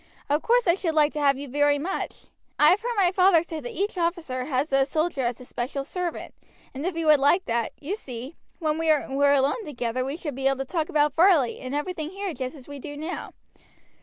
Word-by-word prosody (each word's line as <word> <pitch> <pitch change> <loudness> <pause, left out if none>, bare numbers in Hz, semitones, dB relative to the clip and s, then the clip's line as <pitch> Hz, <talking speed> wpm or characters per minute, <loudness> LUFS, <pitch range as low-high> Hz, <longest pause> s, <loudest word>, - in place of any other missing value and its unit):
Of 295 +2 +2
course 480 -2 +2
I 340 - +6
should 340 -4 -2
like 300 -1 +4
to 300 - -3
have 280 -2 +3
you 285 +1 -6
very 290 +2 +2
much. 335 +7 -4 0.3
I 300 - +7
have 380 - +2
heard 480 +1 -2
my 365 -3 +4
father 365 -3 +5
say 330 -2 -6
that 245 -5 -6
each 400 -1 -1
officer 335 -7 -1
has 275 +1 -1
a 270 0 +5
soldier 310 +1 -1
as 240 -1 -1
his 250 - -13
special 265 +3 -3
servant; 350 +4 -4 0.4
and 285 +5 -3
if 360 -3 -3
you 330 - -1
would 305 -2 +6
like 290 +7 +3
that, 230 -1 -1
you 325 +8 -3
see, 260 - -8 0.2
when 310 -2 -1
we 325 - -1
were 285 -2 +3
alone 285 - +1
together 250 - -3
we 275 +4 -4
should 300 -4 -5
be 270 +1 -1
able 270 0 +2
to 270 - -3
talk 320 +2 -2
about 295 -2 +2
Varley 330 -8 +4
and 260 +2 -5
everything 310 +1 -3
here 390 0 -4
just 260 0 -5
as 265 -4 -13
we 285 -1 -8
do 290 +2 -8
now. 320 +5 -5
295 Hz, 235 wpm, -25 LUFS, 270-345 Hz, 0.4 s, I